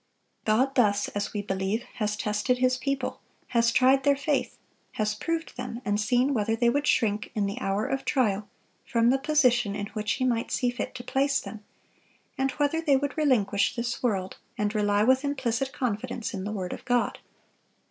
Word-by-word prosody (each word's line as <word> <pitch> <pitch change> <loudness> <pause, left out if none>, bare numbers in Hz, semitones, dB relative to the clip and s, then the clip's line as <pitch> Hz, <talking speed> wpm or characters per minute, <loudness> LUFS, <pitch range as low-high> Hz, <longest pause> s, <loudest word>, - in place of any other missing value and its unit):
God 250 +5 +2
thus, 205 -5 +2
as 205 0 -3
we 205 -1 -3
believe, 195 +3 -1 0.2
has 210 -1 0
tested 210 +5 0
His 255 0 +2
people, 270 0 -3 0.3
has 235 -1 +3
tried 260 +2 +4
their 280 0 +4
faith, 285 +1 -1 0.4
has 210 -1 0
proved 330 +9 -3
them, 245 -1 -5
and 205 +1 +1
seen 250 +5 +2
whether 225 -2 +1
they 235 +1 +3
would 285 +3 0
shrink, 210 -3 +1
in 210 -2 +1
the 200 +1 -3
hour 195 +2 0
of 270 0 -2
trial, 210 -6 0 0.3
from 235 -1 +2
the 270 - +2
position 250 -8 +2
in 205 - -3
which 210 0 -1
He 260 - -1
might 235 -2 0
see 245 -1 +1
fit 245 - -5
to 245 - -6
place 275 +2 +1
them; 215 -1 -9 0.7
and 270 -1 0
whether 295 +2 0
they 290 -5 +4
would 285 +1 -2
relinquish 240 -11 +2
this 240 0 -3
world 195 -6 -1 0.2
and 210 0 0
rely 205 -1 +2
with 260 +4 +4
implicit 270 -2 -1
confidence 245 -2 -3
in 190 -2 -4
the 210 - -3
word 185 -4 -4
of - - -9
God." 245 -1 0
240 Hz, 190 wpm, -27 LUFS, 210-265 Hz, 0.7 s, tried